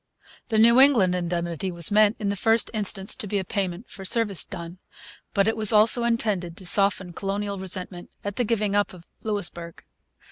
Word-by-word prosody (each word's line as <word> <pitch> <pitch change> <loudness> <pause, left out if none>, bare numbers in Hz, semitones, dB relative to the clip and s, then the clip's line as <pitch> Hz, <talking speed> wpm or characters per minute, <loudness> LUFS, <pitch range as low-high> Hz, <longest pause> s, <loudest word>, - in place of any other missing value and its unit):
The 220 - 0
New 235 +3 +5
England 240 -10 +4
indemnity 175 0 -3
was 170 0 +1
meant, 210 +1 +3
in 205 -2 -3
the 200 - -2
first 225 +3 +2
instance, 200 -2 +2
to 210 - -6
be 205 - -2
a 195 - -2
payment 195 +1 -4
for 195 - -11
service 205 -1 +3
done. 170 +1 -9 0.6
But 200 0 +2
it 220 - 0
was 215 -2 +4
also 220 +3 +3
intended 205 -7 -2
to 190 - -10
soften 195 -1 +2
colonial 200 +1 -4
resentment 185 -1 -4
at 205 0 -6
the 245 - +1
giving 210 -3 -1
up 205 -2 -1
of 170 -1 -16 0.2
Louisbourg. 175 -6 -5
200 Hz, 185 wpm, -24 LUFS, 180-215 Hz, 0.6 s, New